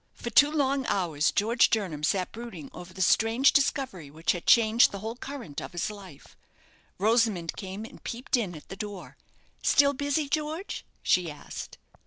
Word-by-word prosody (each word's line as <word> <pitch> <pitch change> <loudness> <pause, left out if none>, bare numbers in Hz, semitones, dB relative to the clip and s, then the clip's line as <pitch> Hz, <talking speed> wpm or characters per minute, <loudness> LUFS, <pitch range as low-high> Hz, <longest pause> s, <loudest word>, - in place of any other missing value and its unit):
For 235 - -6
two 290 +6 +6
long 275 -3 0
hours 160 -5 +1
George 230 +4 +3
Jernam 185 -9 -1
sat 185 +3 0
brooding 220 - -9
over 180 0 -10
the 190 0 -1
strange 225 +8 +4
discovery 265 - 0
which 160 +4 -1
had 175 - -5
changed 230 0 +6
the 200 - -5
whole 220 +3 -5
current 245 - -7
of - - -8
his 175 +4 -2
life. 190 -8 -13 0.6
Rosamond 215 -5 +1
came 195 +2 -6
and - - -14
peeped 240 +3 -2
in 205 -8 -2
at 150 - -12
the 195 - -6
door. 205 -1 -7 0.5
"Still 280 0 +4
busy, 285 +2 -1
George?" 310 +6 -3 0.2
she 180 -2 +2
asked. 150 - -8
215 Hz, 170 wpm, -27 LUFS, 180-260 Hz, 0.6 s, two